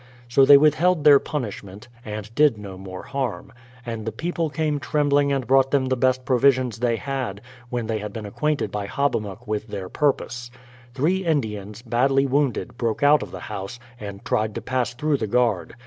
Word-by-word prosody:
So 135 +3 +5
they 140 +1 +9
withheld 155 +3 +3
their 145 -2 +8
punishment, 105 -9 -6 0.2
and 105 0 -7
did 145 -3 +4
no 100 -2 -8
more 95 0 -8
harm; 135 -5 -4 0.3
and 115 -2 -5
the 110 - -3
people 165 +6 -2
came 150 -1 -1
trembling 145 -1 +1
and 135 -2 0
brought 135 +1 +4
them 135 -1 +2
the 130 - +2
best 130 0 +1
provisions 130 -3 +2
they 120 -1 +1
had, 130 -6 -4 0.3
when 120 -2 -2
they 110 -1 -2
had 105 0 -6
been 110 0 -6
acquainted 150 +8 -1
by 105 -1 -3
Hobbamok 115 -5 -2
with 110 +1 -3
their 100 -3 -6
purpose. 125 -4 -1 0.5
Three 175 +8 +1
Indians, 110 - -2
badly 135 +3 +2
wounded, 130 -3 -1
broke 115 +2 -1
out 145 +1 +6
of - - -6
the - - -8
house, 100 +5 -6 0.2
and 100 -1 -8
tried 110 -1 0
to - - -4
pass 125 -2 -1
through 150 +3 0
the 110 - -3
guard. 110 -7 0
125 Hz, 185 wpm, -23 LUFS, 110-140 Hz, 0.5 s, they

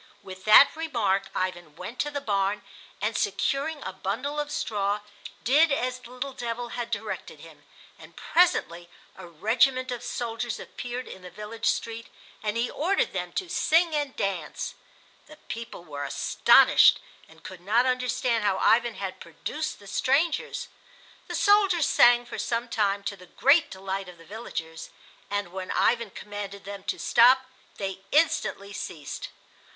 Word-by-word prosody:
With 190 -1 -10
that 215 +8 +8
remark 225 -12 0
Ivan 175 -4 -3
went 235 +9 -8
to 295 - 0
the 285 -1 -3
barn 200 -3 0 0.4
and, - - -1
securing 290 +2 -1
a 190 - -5
bundle 255 +11 -3
of 295 0 -2
straw, 205 -1 -1 0.4
did 295 +6 +4
as 255 -2 -1
the 245 - -14
little 255 +2 -5
devil 240 -1 -4
had 235 0 -4
directed 220 -2 -5
him; - - -15 0.3
and - - -14
presently 175 - +1 0.3
a 185 -2 -10
regiment 245 - +2
of 245 - -4
soldiers 235 -1 -3
appeared 245 +1 -6
in 190 - -10
the 180 - -10
village 210 +5 -5
street, 230 0 -1 0.3
and 210 +1 -2
he 235 +1 +1
ordered 365 +7 0
them - - -3
to 385 -5 -2
sing 335 -1 +2
and 290 -3 -1
dance. 190 -6 -3 0.5
The 305 - -14
people 230 - -8
were 145 -4 -6
astonished 140 - +5 0.3
and - - -19
could 185 -2 -9
not 220 +7 +3
understand 250 -2 0
how 200 -2 +2
Ivan 235 +3 +3
had 190 -2 -5
produced 300 - -5
the 200 - -16
strangers. 280 - 0 0.6
The - - -4
soldiers 395 -7 +4
sang 240 0 +5
for - - -7
some 235 0 -2
time, 200 -3 0
to 200 0 -3
the 180 -2 -15
great 285 - +4
delight 190 0 -5
of 180 - -13
the 165 - -16
villagers; 165 -6 -7 0.4
and 205 -3 -2
when 190 -1 -5
Ivan 235 -2 +2
commanded 200 0 -8
them 200 -1 -7
to - - -2
stop 255 +2 +5 0.3
they 195 -1 -4
instantly 285 -10 +1
ceased. 160 -8 -6
230 Hz, 155 wpm, -26 LUFS, 195-255 Hz, 0.6 s, that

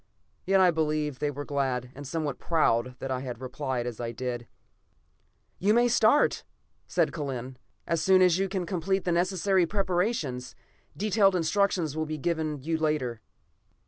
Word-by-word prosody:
Yet 195 0 +4
I 185 -2 +6
believe 150 -3 -1
they 150 - 0
were 145 0 -5
glad 130 -3 -1
and 140 0 -9
somewhat 145 -2 -3
proud 125 -7 +1
that 135 - -5
I 130 - -1
had 125 -3 -6
replied 130 -1 -3
as 120 -3 -5
I 115 -1 -3
did. 120 0 -4 1.1
"You 205 +4 +3
may 240 +1 +5
start," 240 +4 +3 0.4
said - - +1
Kellen, 130 -4 -5 0.3
"as 165 -2 0
soon 185 +1 +5
as 180 -1 +4
you 195 0 0
can 190 -2 -2
complete 185 +2 -1
the 180 - +1
necessary 185 +1 +2
preparations. 180 - -1 0.4
Detailed 205 -2 +3
instructions 175 -2 +1
will 155 0 -2
be 155 0 -3
given 155 -3 -2
you 160 +1 -1
later." 150 -7 -1
155 Hz, 160 wpm, -28 LUFS, 130-185 Hz, 1.1 s, I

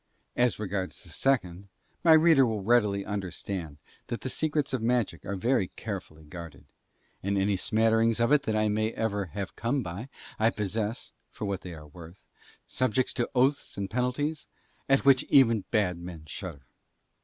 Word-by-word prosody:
As 120 -1 +2
regards 95 -3 -4
the - - -14
second, 100 -8 0 0.4
my 165 -2 +7
reader 160 -3 +6
will 110 -5 -1
readily 105 -3 +2
understand 95 -5 -4 0.3
that 120 - -4
the 130 - -3
secrets 150 -3 0
of 130 - 0
magic 115 -7 0
are 100 - -2
very 115 0 +1
carefully 95 -7 -6
guarded, 80 -2 -10 0.6
and 100 +1 0
any 100 +1 +2
smatterings 115 +3 +2
of 115 +3 +2
it 150 -1 +5
that 110 - 0
I 110 0 +2
may 110 +1 0
ever 100 -3 -1
have 95 +2 -6
come 120 +4 -1
by 100 +9 -6 0.3
I 110 +1 +4
possess, 105 +1 -3 0.2
for - - -6
what 100 -2 -2
they 90 -2 -8
are 75 -1 -11
worth, 85 +4 -13 0.4
subjects 130 0 0
to 120 - -1
oaths 135 0 +1
and 100 -1 -3
penalties 125 +6 -1 0.4
at 135 0 +3
which 135 -2 +6
even 115 -7 +4
bad 95 -6 +1
men 85 -3 -8
shudder. 75 -2 -7
110 Hz, 165 wpm, -28 LUFS, 95-125 Hz, 0.6 s, my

